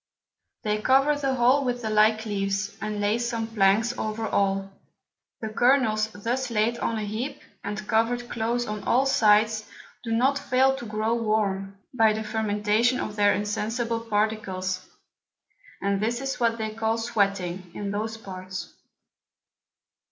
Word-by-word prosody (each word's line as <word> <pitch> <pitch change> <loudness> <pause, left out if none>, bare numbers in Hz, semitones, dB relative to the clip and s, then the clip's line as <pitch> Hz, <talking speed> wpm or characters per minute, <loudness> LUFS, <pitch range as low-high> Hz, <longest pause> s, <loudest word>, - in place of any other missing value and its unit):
They 210 -1 0
cover 270 +5 +4
the 275 -2 -1
whole 255 +3 +4
with 245 -2 -2
the 220 - -2
like 215 +1 +3
Leaves, 200 -1 -2
and 215 0 -3
lay 205 +3 +1
some 235 -1 -2
Planks 225 +2 +2
over 220 +1 -2
all: 195 0 0 0.7
the 220 - -3
Kernels 220 -2 +3
thus 235 +5 -3
laid 230 +1 +1
on 230 - -1
a 215 - -2
heap, 225 +7 -4 0.2
and 210 0 -5
cover'd 235 +2 +1
close 235 +1 -1
on 210 -2 -5
all 260 +3 +3
sides, 215 -3 +3 0.3
do 230 - -4
not 265 +5 +2
fail 265 0 +3
to 240 -4 -7
grow 215 +2 0
warm, 205 -4 -1 0.2
by 225 -3 +4
the 220 +1 -3
Fermentation 215 +2 +1
of 210 - -4
their 205 -1 +4
insensible 225 +3 -1
Particles; 205 -4 -2 0.9
and 200 0 +1
this 235 +3 0
is 270 0 -3
what 230 -1 +2
they 220 -1 -3
call 225 0 0
Sweating, 195 -6 -1
in 200 -1 -3
those 220 +2 -3
Parts. 185 -3 -7
220 Hz, 150 wpm, -26 LUFS, 210-235 Hz, 0.9 s, cover